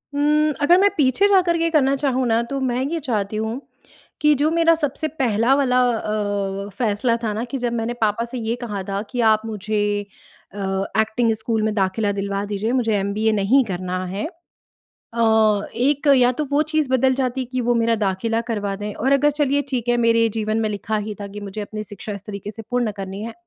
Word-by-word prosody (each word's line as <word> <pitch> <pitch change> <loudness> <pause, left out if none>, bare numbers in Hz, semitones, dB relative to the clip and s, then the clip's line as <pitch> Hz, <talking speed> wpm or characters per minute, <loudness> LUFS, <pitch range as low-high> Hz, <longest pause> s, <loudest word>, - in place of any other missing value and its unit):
हुँ, 300 +1 +2
अगर 345 +5 +5
मैं 400 +1 +5
पीछे 290 +8 +3
जाकर 365 -4 +3
के 330 0 +1
करना 275 -4 +3
चाहूँ 260 -2 0
ना, 225 0 +2
तो 275 +3 -4
मैं 255 0 0
ये 330 +3 -2
चाहती 215 -7 -2
हूँ 220 +5 -3 0.6
कि 300 0 +5
जो 300 +2 +3
मेरा 330 0 +4
सबसे 310 0 -1
पहला 230 0 +2
वाला 255 -3 +2
अ, 205 -3 -2
फ़ैसला 230 +1 +1
था 215 - 0
ना 220 - -3
कि 270 - -3
जब 240 -1 -2
मैंने 230 +1 -2
पापा 220 +2 +1
से 245 +2 -6
ये 225 0 -2
कहा 205 -5 -4
था 195 0 -1
कि, 245 - -4
"आप 220 -1 +4
मुझे 210 -1 -1 0.5
अ, 205 - -10 0.4
एक्टिंग 225 +1 +1
स्कूल 220 0 -1
में 220 -1 0
दाख़िला 205 +1 0
दिलवा 200 0 -2
दीजिए, 205 +3 -2
मुझे 235 -4 +1
एमबीए 210 +3 0
नहीं 215 +6 +3
करना 185 -1 -3
है।" 195 +3 -3 0.7
अ, 220 -3 +1
एक 285 +4 0
या 245 -1 +5
तो 300 +4 -2
वो 295 +2 +4
चीज़ 310 -3 +1
बदल 260 0 +3
जाती 260 0 -1
कि 255 - 0
वो 240 0 +1
मेरा 230 0 +2
दाख़िला 210 +4 0
करवा 205 -3 -2
दें 210 +1 -5
और 265 +4 0
अगर 290 +2 +4
चलिए 285 -1 +1
ठीक 245 -2 -2
है, 240 - +3
मेरे 230 -1 +3
जीवन 215 +1 0
में 220 - 0
लिखा 210 +1 -3
ही 210 - -4
था 200 - -4
कि 205 +1 -8
मुझे 205 +1 -6
अपनी 215 +1 -6
शिक्षा 205 +1 -7
इस 200 0 -8
तरीके 200 -1 -6
से 225 +1 -9
पूर्ण 245 -3 0
करनी 195 +1 -6
है। 230 - -5
230 Hz, 210 wpm, -21 LUFS, 210-265 Hz, 0.7 s, अगर